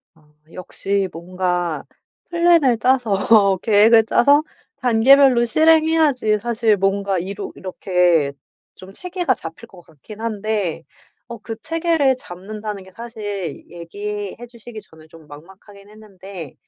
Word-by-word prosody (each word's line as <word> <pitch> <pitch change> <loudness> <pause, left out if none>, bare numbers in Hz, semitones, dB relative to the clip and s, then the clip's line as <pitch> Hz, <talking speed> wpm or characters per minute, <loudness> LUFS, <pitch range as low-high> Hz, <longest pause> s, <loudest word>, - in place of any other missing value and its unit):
아. 150 -2 -27 0.2
역시 195 +2 -3
뭔가 175 -2 -3 0.5
플랜을 335 -8 +3
짜서 215 -5 +2
계획을 220 +1 +5
짜서 285 +6 +3 0.3
단계별로 250 +1 +4
실행해야지 310 -5 +3
사실 225 -1 0
뭔가 195 0 0
이루 195 +3 -6
이렇게 180 -5 0 0.4
좀 185 +1 -14
체계가 355 - -2
잡힐 165 +3 -10
것 185 - -16
같긴 165 +8 -14
한데 210 -6 -3 0.5
어 235 - -7
그 225 +1 -8
체계를 320 +1 0
잡는다는 210 -1 -8
게 190 - -16
사실 205 -7 -7
얘기해 205 +4 -7
주시기 235 -1 -11
전에 160 -6 -17
좀 160 -1 -17
막막하긴 195 +7 -15
했는데 195 -6 -11
210 Hz, 260 characters per minute, -20 LUFS, 185-240 Hz, 0.5 s, 계획을